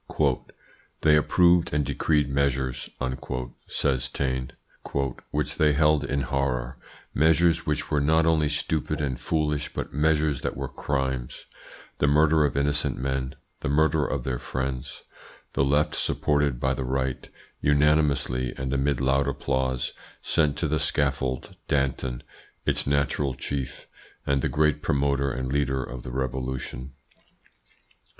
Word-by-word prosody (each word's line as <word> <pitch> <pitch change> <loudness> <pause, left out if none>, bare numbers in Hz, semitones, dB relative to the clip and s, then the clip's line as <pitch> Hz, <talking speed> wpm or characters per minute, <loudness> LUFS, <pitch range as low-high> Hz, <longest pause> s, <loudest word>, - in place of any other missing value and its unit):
"They 75 -1 +5
approved 85 +3 +4
and 75 -1 +1
decreed 75 +2 +1
measures," 65 -2 -1 0.8
says 65 -3 0
Taine, 65 -2 -2 0.8
"which 75 -2 -2
they 75 -1 +5
held 75 0 +3
in 70 +1 -1
horror 65 -1 -1 0.3
measures 80 +2 +3
which 75 -1 -1
were 75 - +2
not 80 +3 +3
only 80 -2 +3
stupid 75 +1 -1
and 65 -4 -2
foolish, 75 -2 -1
but - - -5
measures 75 -1 +2
that - - -3
were 70 0 -3
crimes 65 -2 -3 0.5
the 70 - +3
murder 75 +2 +4
of 70 - -1
innocent 70 +1 0
men, 65 0 -2 0.2
the - - -3
murder 80 +1 +3
of 70 -3 -2
their 60 -1 -2
friends. 65 -1 -4 0.5
The - - +2
Left, 70 +2 +2
supported 75 -4 +1
by 65 +1 +1
the 65 - -3
Right, 65 0 -2 0.3
unanimously 70 -4 +2
and 65 0 -2
amid 70 -1 +1
loud 65 +1 +2
applause, 65 -2 -1 0.3
sent 75 -2 +2
to 80 - 0
the 75 +1 0
scaffold 70 -3 -1
Danton, 65 -3 -1 0.4
its - - 0
natural 70 -1 +1
chief, 70 +1 -4 0.4
and 70 -1 +1
the - - 0
great 75 0 +2
promoter 70 -1 +1
and 65 +1 -3
leader 65 -2 +1
of 60 0 -7
the - - -7
Revolution. 65 0 -4
70 Hz, 135 wpm, -26 LUFS, 65-75 Hz, 0.8 s, They